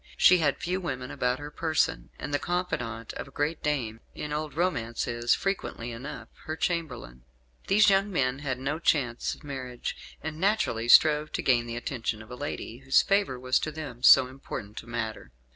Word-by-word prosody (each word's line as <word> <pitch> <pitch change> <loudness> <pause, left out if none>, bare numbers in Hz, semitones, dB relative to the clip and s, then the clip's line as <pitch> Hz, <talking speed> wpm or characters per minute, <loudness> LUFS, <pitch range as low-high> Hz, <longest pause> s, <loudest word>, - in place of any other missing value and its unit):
She 180 0 +7
had 145 -4 +2
few 185 +3 -2
women 130 -7 -4
about 125 +1 0
her 145 +1 -8
person, 160 0 0
and 145 - -6
the 145 - +2
confidant 120 -11 -3
of - - -6
a - - -12
great 150 +3 -2
dame 120 -7 -1 0.2
in 150 0 -4
old 150 -1 -3
romance 125 -10 -1
is, 120 0 +2
frequently 185 -11 -3
enough, 125 0 -7 0.2
her 155 - -3
chamberlain. 140 - -3 0.5
These 205 +1 +6
young 195 +1 +2
men 135 -6 0
had 135 -3 -2
no 140 +4 -2
chance 125 -8 +1
of - - -20
marriage, 130 -4 -6
and 155 0 -5
naturally 185 - +1
strove 150 +4 +6
to - - -2
gain 120 -3 +3
the 115 0 -4
attention 115 -3 -3
of 110 - -15
a - - -5
lady, 125 -4 -5
whose 135 0 +4
favour 195 -11 +1
was 130 0 +2
to 155 - -3
them 150 -6 -7
so 130 - +8
important 125 -5 -7
a - - -18
matter. 110 - -4
135 Hz, 190 wpm, -28 LUFS, 120-155 Hz, 0.5 s, so